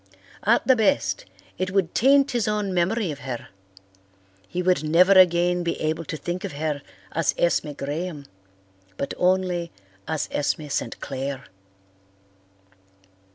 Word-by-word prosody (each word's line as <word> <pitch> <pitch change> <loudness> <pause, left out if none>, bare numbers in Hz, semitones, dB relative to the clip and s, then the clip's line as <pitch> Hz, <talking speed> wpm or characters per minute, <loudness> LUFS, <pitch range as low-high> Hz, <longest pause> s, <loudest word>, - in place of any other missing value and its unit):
At - - +4
the 260 - +5
best, 285 - +1 0.3
it 185 0 0
would 190 -3 0
taint 275 +2 +4
his 240 -4 0
own 210 -2 -1
memory 185 +2 +1
of 145 - -7
her; 130 -3 -6 1.0
he 180 - -3
would 180 -4 +2
never 170 +5 +5
again 180 -1 +5
be 170 -1 -2
able 160 +1 -1
to 155 - -5
think 175 +5 -4
of 200 - -4
her 150 -1 -2 0.3
as 165 -1 0
Esme 170 -3 +1
Graham 145 +2 -4 0.7
but 140 - -3
only 180 -2 +1 0.4
as 155 -2 -1
Esme 145 +1 -1
St. - - -3
Clair. 135 0 -4
175 Hz, 135 wpm, -24 LUFS, 150-190 Hz, 1.0 s, the